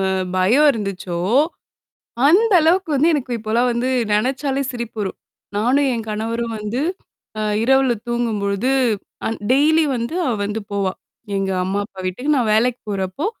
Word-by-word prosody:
அ 190 - +1 0.3
பயம் 230 +12 +4
இருந்துச்சோ! 195 -7 -4 1.1
அந்த 410 +8 +4
அளவுக்கு 335 +2 +2
வந்து 305 +5 +4
எனக்கு 260 -4 -2
இப்பலாம் 225 +3 +1
வந்து 240 +2 -1 0.2
நெனச்சாலே 265 +5 0
சிரிப்பு 235 -2 -6
வரும். 195 -2 -3 0.4
நானும், 260 +7 +2
என் 230 -2 -3
கணவரும் 225 +2 -2
வந்து, 210 +4 -3 0.6
அ - - -1 0.2
இரவுல 265 0 +3
தூங்கும்பொழுது 225 -1 -1 0.6
அ - - +1 0.2
டெய்லி 310 +4 +4
வந்து 235 +8 -3
அவ 255 - +1
வந்து 210 +2 -3
போவா! 195 -2 0 0.4
எங்க 195 0 -1
அம்மா, 195 +2 -1
அப்பா 190 -2 -12
வீட்டுக்கு. 250 +12 0
நான் 235 -5 +1
வேலைக்கு 240 +3 +2
போறப்போ, 195 - -2
235 Hz, 145 wpm, -20 LUFS, 205-270 Hz, 1.1 s, பயம்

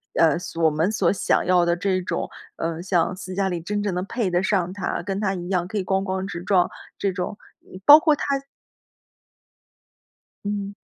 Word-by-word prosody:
呃， 160 -1 +4
所 170 -1 -6
我 - - +6
们 160 +6 0
所 195 -5 +2
想 - - +1
要 180 -1 +4
的 170 - +2
这 185 0 0
种 180 - -3 0.3
呃， 165 0 -3
像 180 -1 +1
斯 185 0 -7
嘉 195 +1 0
丽 175 -3 -2
真 205 +5 -2
正 205 -2 -1
能 180 +1 -2
配 230 -1 -1
得 175 +1 +1
上 185 -2 0
她， 200 - -3
跟 195 +2 -3
她 195 -2 +1
一 175 -2 -5
样 180 -2 0
可 215 - -3
以 190 - -1
咣 190 0 +1
咣 190 -1 -2
直 170 -3 -6
撞， 180 -2 +3 0.3
这 195 -2 -1
种 180 +3 -4 0.2
嗯， 185 - -13
包 295 - +11
括 315 -1 +3
她 290 - -3 2.2
嗯。 205 -1 -3
185 Hz, 215 characters per minute, -23 LUFS, 175-200 Hz, 2.2 s, 包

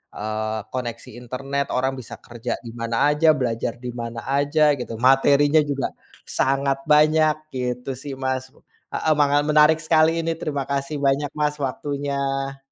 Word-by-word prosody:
eee, 110 +1 -3
koneksi 120 -3 -5
internet 135 +3 -3
orang 130 +1 +1
bisa 120 - -9
kerja 120 0 -4
di 115 - -7
mana 115 0 -2 0.2
aja, 150 +2 +2
belajar 115 -2 -1
di 125 - -4
mana 115 -1 -6
aja 145 +2 +2 0.2
gitu. 125 - -5
Materinya 140 +4 +4
juga 135 -2 -1 0.5
sangat 135 0 +1
banyak 155 +1 +5 0.2
gitu 125 0 -3
sih 145 -1 -6
Mas. 130 0 -1 0.5
Heeh 160 - 0
manga 145 0 +4
menarik 150 +1 +5
sekali 160 0 +4
ini. 165 - 0
Terima 145 -4 -2
kasih 140 +2 -2
banyak 140 +1 +2
Mas 150 0 0
waktunya. 140 0 -2
135 Hz, 145 wpm, -23 LUFS, 125-145 Hz, 0.5 s, banyak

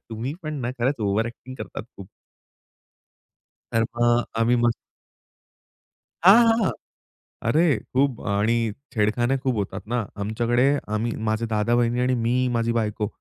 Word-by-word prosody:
तुम्ही 115 +6 -4
पण 155 0 -4
ना 120 0 -2
खरंच 130 +4 +1
ओव्हर 105 +2 +1
अ‍ॅक्टिंग 120 +2 -9
करतात - - -6
खूप. 95 -1 -10 1.7
तर 115 - +3
मग 120 +1 +1
आम्ही 120 +2 +3
मस्त 120 -1 +3 1.5
हां, 220 +6 +8
हां 225 -3 +2 0.8
अरे 155 +7 +3 0.3
खूप 135 -1 +1
आणि 105 +3 +2 0.4
छेडखाने 120 +5 +1
खूप 130 -4 +1
होतात 100 -2 -3
ना 120 -4 0 0.2
आमच्याकडे 120 +4 +1 0.3
आम्ही 115 +2 -1
माझे 110 +2 0
दादा-वहिणी 115 +2 +1
आणि 130 +1 +2
मी, 125 +2 +1
माझी 115 -1 0
बायको 110 -2 -1
120 Hz, 130 wpm, -24 LUFS, 110-125 Hz, 1.7 s, हां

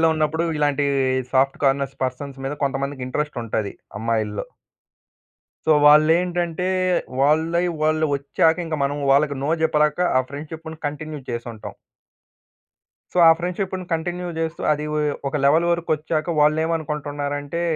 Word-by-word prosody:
కాలేజ్‍లో 165 - +5
ఉన్నప్పుడు 155 +1 0
ఇలాంటి 145 -1 +1 0.5
సాఫ్ట్ 135 +1 +2
కార్నర్స్ 135 0 +1
పర్సన్స్ 135 +2 -5
మీద 135 - -2
కొంతమందికి 140 -1 -2
ఇంట్రెస్ట్ 150 +3 -3
ఉంటది 105 -2 -2 0.3
అమ్మాయిల్లో. 110 -2 -1 1.2
సో, 160 - +5
వాళ్ళేంటంటే, 170 +3 +4 0.5
వాళ్ళై 160 +5 +2 0.2
వాళ్ళు 155 0 +2
ఒచ్చాకింక 160 +4 +1
మనం 140 +1 -1
వాళ్ళకి 145 +1 +3
నో 145 - 0
జెప్పలేక 150 -1 +2 0.2
ఆ - - +5
ఫ్రెండ్‌షిప్‌ను 160 +3 -8
కంటిన్యూ 150 +1 -5
చేసుంటాం. 120 -2 -6 1.4
సో, - - 0
ఆ - - +9
ఫ్రెండ్‌షిప్‌ను 185 +1 -3
కంటిన్యూ 175 +2 -2
జేస్తూ 165 0 -3
అది 150 0 -1
వొ 150 - 0 0.3
ఒక 140 - -3
లెవెల్ 160 +4 +4
వరకొచ్చాక 160 -1 -1
వాళ్ళేమనుకుంటున్నారంటే, 150 -1 -1
150 Hz, 120 wpm, -22 LUFS, 140-160 Hz, 1.4 s, ఆ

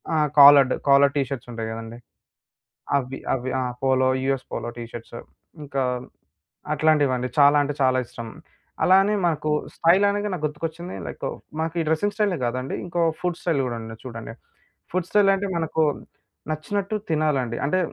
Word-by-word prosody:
ఆ! - - +1 0.2
Collared. 140 -2 +9
Collar 140 0 +6
T 145 - +2
shirts 125 -3 -6
ఉంటాయి 115 -1 -4
కదండీ! 115 +1 -7 1.0
అవి 135 -1 -3 0.2
అవి. 130 0 -3
ఆ! - - -1 0.2
Polo 130 -1 +3
US 135 -1 -1
polo - - -4
T 120 - -6
shirts, 120 0 -9 0.5
ఇంకా 140 -2 -2 0.9
అట్లాంటివండి. 145 -5 +2
చాలా 145 0 +6
అంటే 145 0 -2
చాలా 130 -1 +3
ఇష్టం. 115 0 -9 0.6
అలానే 195 +3 +5
మనకు 155 -2 -1 0.2
స్టైల్ 175 +4 +4
అనగా 205 +1 -1
నాకు 170 -4 -4
గుర్తుకొచ్చింది. 165 +3 -6
లైకు - - -5 0.3
మాకు 160 0 -2
ఈ - - +2
డ్రెసింగ్ 180 +6 0
స్టైలే 205 -4 +1
కాదండి. 125 +2 -3
ఇంకో 175 0 -2 0.2
ఫుడ్ 180 -1 -2
స్టైల్ 165 -5 0
గూడా 120 -2 -3
ఉంది 115 0 -8
చూడండి. 115 -3 -7 0.6
ఫుడ్ 180 -1 -1
స్టైల్ 205 -1 +4
అంటే 195 +1 -2
మనకు 160 -1 0 0.7
నచ్చినట్టు 200 +7 -2
తినాలండి. 145 -7 0
అంటే 185 +6 +1
145 Hz, 155 wpm, -23 LUFS, 130-170 Hz, 1.0 s, Collared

